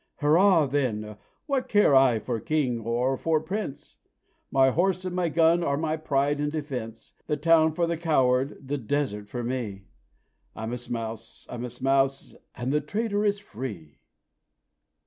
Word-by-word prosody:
Hurrah! 165 +2 +4
then, 115 -7 -2 0.3
what 275 -3 -1
care 205 -8 +4
I 130 -3 +5
for 115 +1 -3
king 130 -4 0
or 120 +4 0
for 160 +2 +1
prince? 180 -1 -6 0.5
My 135 0 +4
horse 185 +4 +1
and 180 -1 -3
my 180 -2 +1
gun 165 +2 +3
are 140 -3 0
my 155 0 -1
pride 145 -2 0
and 150 0 -1
defence; 130 -7 -6
The 150 - 0
town 160 +1 +4
for 170 +2 +1
the 170 0 -2
coward 135 -4 +1
the 145 +1 -2
desert 115 -4 -2
for 120 +2 -4
me! 115 -6 -4 0.7
I'm 110 +2 -4
a 125 - -3
Smouse, 115 -2 -6
I'm 120 -1 -5
a - - -5
Smouse, 135 +2 0 0.2
and 125 +3 -2
the 150 - +2
trader 205 +6 -1
is 205 -1 +2
free!" 105 - -8
140 Hz, 160 wpm, -26 LUFS, 120-160 Hz, 0.7 s, I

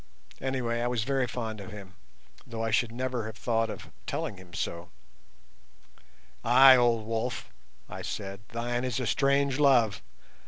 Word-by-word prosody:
Anyway, 125 -3 -1
I 120 - 0
was 120 -3 0
very 135 0 0
fond 110 -3 -4
of 95 - -9
him, 100 -2 -10 0.5
though 115 -1 -4
I 115 - -1
should 110 +2 +2
never 125 -1 -3
have 110 0 -8
thought 115 0 0
of - - -8 0.2
telling 100 - -3
him 90 -1 -14
so. 85 0 -4 1.5
"Ay, 130 +3 +8
old 120 -3 +3
wolf," 115 +3 -3 0.4
I - - -7
said, 100 -1 -5
"thine 120 +1 -2
is 130 -1 -1
a 125 - -2
strange 140 +1 +2
love. 120 -8 +4
120 Hz, 155 wpm, -29 LUFS, 110-130 Hz, 1.5 s, Ay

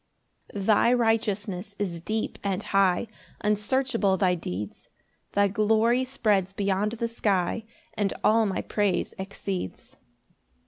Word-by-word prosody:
5 200 -1 -3
Thy 220 +2 +5
righteousness 210 -4 0
is 175 -5 -3
deep 215 +5 -3
and 200 0 -1
high, 195 0 +2 0.4
Unsearchable 210 -1 +1
thy 185 -1 +3
deeds; 105 - -6 0.4
Thy 200 0 +4
glory 220 +5 +2
spreads 210 -8 +1
beyond 200 +2 0
the 235 0 -2
sky, 210 -2 0 0.3
And 205 -2 0
all 220 0 +4
my 195 - -1
praise 205 -3 0
exceeds. 190 - -5
205 Hz, 120 wpm, -26 LUFS, 190-225 Hz, 0.4 s, Thy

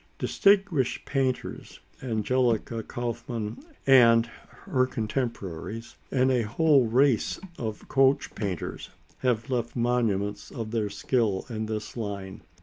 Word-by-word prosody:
Distinguished 195 - +2
painters, 135 -2 -2 0.2
Angelica 115 -1 0
Kauffmann 120 -2 -4 0.3
and 115 -4 +7
her 130 +2 -3
contemporaries, 115 -3 -4
and 130 0 +2
a 125 -2 +3
whole 135 +3 +3
race 125 +1 +2 0.2
of 110 -3 -5
coach 135 0 +3
painters 100 -6 -4 0.3
have 125 -1 0
left 120 -2 -1
monuments 110 -4 0
of 115 -4 -6
their 110 -3 0
skill 105 -1 0
in 110 -1 -3
this 110 -1 -4
line. 100 -4 -5
115 Hz, 110 wpm, -27 LUFS, 110-130 Hz, 0.3 s, and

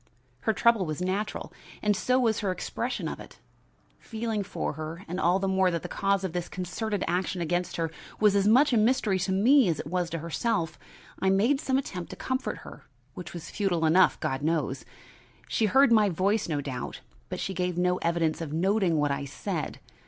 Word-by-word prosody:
Her 220 - +1
trouble 225 -5 +3
was 155 -1 -3
natural 190 +4 -3 0.3
and 210 -1 +3
so 255 +6 +2
was 225 -4 +2
her 200 - -1
expression 185 - -3
of - - -5
it. - - -12 0.6
Feeling 225 -2 -3
for 200 -5 -3
her, 155 +4 -7
and 180 +2 -4
all 175 +1 +3
the 195 0 -1
more 190 -1 +3
that 170 -2 -2
the - - -4
cause 195 -1 0
of 185 -4 -3
this 175 -1 -3
concerted 195 +3 -3
action 180 +2 -1
against 175 +1 -1
her 165 -1 -1 0.3
was 210 -2 +4
as 200 0 +3
much 260 +5 +5
a - - +4
mystery 220 -3 +2
to 185 +1 -1
me 240 +6 +5
as 160 - -1
it - - -4
was 175 +2 -1
to 165 - -3
herself, 170 +2 -2 0.4
I 190 - +2
made 230 +9 +3
some 265 -3 +1
attempt 185 -10 -4
to - - -7
comfort 260 0 -2
her, - - -12 0.3
which 180 -3 -8
was 165 -2 -7
futile 175 -5 0
enough, 180 +4 +4
God 135 +1 -2
knows. 150 -4 -1 0.6
She 220 - +1
heard 265 +4 +5
my 215 -3 +5
voice, 195 +3 0
no 145 -3 0
doubt, 130 -3 -5 0.3
but - - -4
she 195 - -3
gave 180 -1 -2
no 180 0 +2
evidence 170 -2 0
of 160 -3 -4
noting 185 +1 +2
what 145 -1 +1
I 140 0 -2
said. 135 - -4
185 Hz, 205 wpm, -28 LUFS, 165-215 Hz, 0.6 s, much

